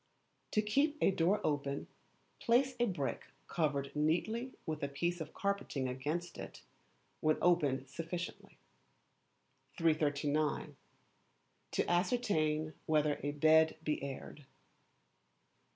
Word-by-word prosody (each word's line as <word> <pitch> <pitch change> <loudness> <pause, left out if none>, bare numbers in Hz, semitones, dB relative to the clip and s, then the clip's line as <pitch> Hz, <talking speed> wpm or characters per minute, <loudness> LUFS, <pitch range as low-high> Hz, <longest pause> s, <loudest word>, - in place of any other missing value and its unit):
To 215 - +3
keep 280 +8 +2
a - - +4
door 190 +3 +2
open, 140 -2 -1 0.5
place 255 +2 +3
a 240 - +3
brick 140 - -3 0.2
covered 145 -4 -1
neatly 200 +12 0
with 155 -2 -3
a 140 - 0
piece 170 +5 -2
of 155 - -7
carpeting 200 -9 -1
against 150 +8 -3
it, - - -8 0.6
when 155 0 +2
opened 145 -7 +2
sufficiently. 170 +5 -6 1.2
339. 150 -2 +1 1.0
To - - +1
Ascertain 160 -6 +1
whether 150 -1 +2
a 145 - -1
Bed 160 +2 +4
be 150 -1 -1
Aired. 140 +1 -7
155 Hz, 105 wpm, -35 LUFS, 145-180 Hz, 1.2 s, a